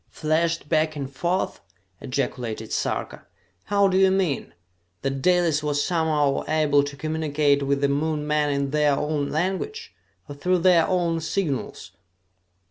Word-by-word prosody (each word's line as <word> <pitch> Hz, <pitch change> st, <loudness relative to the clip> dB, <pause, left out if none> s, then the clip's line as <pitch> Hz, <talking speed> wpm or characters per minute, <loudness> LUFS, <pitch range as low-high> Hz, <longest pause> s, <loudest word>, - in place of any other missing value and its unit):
"Flashed 165 Hz, +1 st, -1 dB
back 155 Hz, 0 st, +1 dB
and 140 Hz, -2 st, -5 dB
forth!" 175 Hz, +5 st, -1 dB, 0.4 s
ejaculated 125 Hz, -4 st, -3 dB
Sarka. -, -, -3 dB, 0.4 s
"How 200 Hz, 0 st, +3 dB
do 190 Hz, 0 st, +2 dB
you 190 Hz, 0 st, +5 dB
mean? 180 Hz, -, -1 dB, 0.5 s
That 135 Hz, 0 st, -2 dB
Dalis 175 Hz, -2 st, +2 dB
was 145 Hz, -1 st, 0 dB
somehow 155 Hz, -5 st, +1 dB
able 150 Hz, -2 st, +3 dB
to 145 Hz, 0 st, -7 dB
communicate 150 Hz, -2 st, +1 dB
with 140 Hz, 0 st, 0 dB
the 140 Hz, -, +3 dB
Moon 150 Hz, +2 st, -1 dB
men 150 Hz, 0 st, +1 dB
in 140 Hz, -1 st, -1 dB
their 150 Hz, -1 st, +3 dB
own 150 Hz, 0 st, -1 dB
language, 195 Hz, -, -3 dB, 0.3 s
or 145 Hz, -, -7 dB
through 180 Hz, +6 st, +1 dB
their 175 Hz, -3 st, +5 dB
own 175 Hz, -3 st, 0 dB
signals?" 160 Hz, -4 st, -3 dB
150 Hz, 140 wpm, -24 LUFS, 140-170 Hz, 0.5 s, you